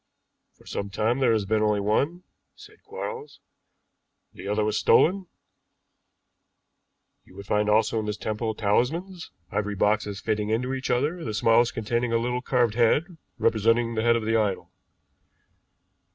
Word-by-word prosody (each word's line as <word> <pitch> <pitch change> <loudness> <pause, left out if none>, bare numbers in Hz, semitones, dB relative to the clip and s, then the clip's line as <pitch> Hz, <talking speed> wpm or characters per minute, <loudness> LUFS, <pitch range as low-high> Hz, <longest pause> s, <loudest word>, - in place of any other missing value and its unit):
"For - - -22
some 100 - -4
time 110 +6 0
there 130 -3 +3
has 110 -3 +1
been 110 +2 +1
only 105 -1 +2
one," 140 - 0 0.3
said 425 +1 -16
Quarles; 450 +1 -7 0.9
"the - - -9
other 105 +1 0
was 110 0 -1
stolen. 185 - +3 2.0
You 90 - -20
would 100 +1 -9
find 105 +1 +1
also 110 +1 +2
in 105 - -4
this 105 0 -3
temple 110 +1 -3
talismans, 160 - -1 0.2
ivory 105 0 -2
boxes 105 0 0
fitting 105 -1 -2
into 125 +4 -1
each 130 0 -4
other, 150 +8 0
the 110 -2 -4
smallest 115 +3 +3
containing 120 +1 -1
a 115 - +3
little 125 +2 -2
carved 125 -4 +1
head 145 - +2 0.2
representing 115 +2 +2
the 110 - -1
head 115 +1 +3
of 115 -2 -2
the 115 +1 +1
idol. 105 -4 -1
115 Hz, 150 wpm, -25 LUFS, 105-125 Hz, 2.0 s, there